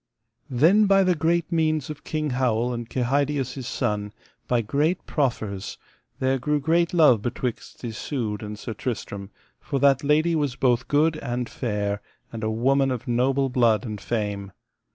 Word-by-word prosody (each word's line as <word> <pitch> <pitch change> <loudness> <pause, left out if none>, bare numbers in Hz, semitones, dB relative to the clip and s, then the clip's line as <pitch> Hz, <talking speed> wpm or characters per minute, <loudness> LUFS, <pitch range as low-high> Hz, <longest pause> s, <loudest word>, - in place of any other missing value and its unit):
Then 170 - +4
by 195 0 +5
the 185 -1 +3
great 170 +1 0
means 155 -3 +1
of 150 - -10
King 155 -2 -2
Howel 125 -1 +1
and 120 -1 -5
Kehydius 135 +1 0
his 130 -4 -6
son, 105 -4 -2 0.3
by 120 -1 +2
great 150 - 0
proffers, 110 -8 -2 0.4
there 130 0 +1
grew 150 +4 0
great 165 +3 +2
love 150 - +5
betwixt 120 +2 -4
Isoud 110 -1 -3
and 105 0 -6
Sir 115 - -6
Tristram, 100 -4 -5 0.3
for 140 - -3
that 140 0 +4
lady 155 +4 +3
was 145 -5 0
both 125 -2 +1
good 155 +2 +2
and 120 -3 -3
fair, 105 -4 -2 0.3
and 115 -1 -5
a 110 - 0
woman 135 +5 +2
of 125 +1 -4
noble 130 +3 +2
blood 115 -4 +2
and 105 -3 -5
fame. 100 -4 -3
130 Hz, 160 wpm, -24 LUFS, 115-150 Hz, 0.4 s, by